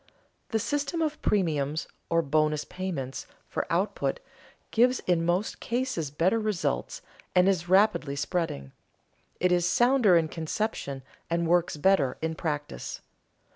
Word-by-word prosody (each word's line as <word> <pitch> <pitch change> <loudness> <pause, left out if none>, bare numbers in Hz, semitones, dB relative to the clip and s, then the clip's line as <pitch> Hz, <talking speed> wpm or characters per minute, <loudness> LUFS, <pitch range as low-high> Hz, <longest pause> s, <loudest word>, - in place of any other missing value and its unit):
The 225 - +1
system 290 +7 -1
of 310 -1 -2
premiums, 155 -6 0 0.2
or 165 0 +2
bonus 150 0 +1
payments, 165 -9 -5 0.2
for - - -3
output, - - 0 0.5
gives 250 +3 +4
in 175 -2 +1
most 175 +5 0
cases 240 - -2
better 170 +10 +1
results 195 - -2 0.3
and 180 +1 +5
is 175 -3 +1
rapidly 190 -7 +3
spreading. 140 - -2 0.7
It 180 0 +2
is 175 0 +3
sounder 240 -4 +5
in 165 -1 +2
conception 160 -4 -3 0.3
and 170 0 0
works 175 -2 +2
better 150 -6 +3
in 160 0 -2
practice. 150 - -4
175 Hz, 130 wpm, -28 LUFS, 150-210 Hz, 0.7 s, and